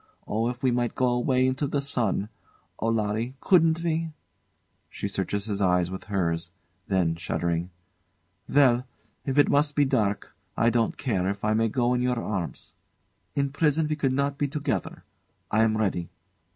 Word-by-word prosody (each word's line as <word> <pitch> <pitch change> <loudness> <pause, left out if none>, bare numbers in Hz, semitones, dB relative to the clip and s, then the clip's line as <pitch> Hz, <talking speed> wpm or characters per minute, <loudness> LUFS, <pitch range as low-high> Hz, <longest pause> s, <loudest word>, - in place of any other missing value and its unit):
Oh, 115 +3 0
if 125 +1 -7
we 130 - +3
might 120 -1 0
go 130 -1 +2
away 125 +1 +2
into 130 +3 0
the 145 - -1
sun! 115 -7 0 0.5
Oh! 115 - -1
Larry 115 +3 -1
couldn't 165 -2 +3
we? 165 -1 0 0.8
[She - - -4
searches 100 0 -2
his 105 -2 -3
eyes 90 -2 +2
with 95 - -6
hers 85 -4 -1 0.4
then 90 -4 +1
shuddering] 85 0 -2 0.8
Well! 130 -3 +4 0.4
If 135 0 -2
it 145 - +6
must 145 0 +2
be 145 - +4
dark 110 -7 0 0.2
I 115 +1 +4
don't 115 -1 +1
care, 100 -9 0
if 100 +1 -2
I 110 - +2
may 115 +1 +2
go 120 +1 +1
in 125 - +1
your 125 0 +1
arms. 95 -7 -4 0.6
In 140 -1 0
prison 150 +1 +2
we 150 - -1
could 140 -3 0
not 140 +1 -1
be 145 - +1
together. 145 +1 -3 0.5
I 110 - +3
am 110 -1 +3
ready. 95 -5 -1
120 Hz, 170 wpm, -26 LUFS, 100-140 Hz, 0.8 s, it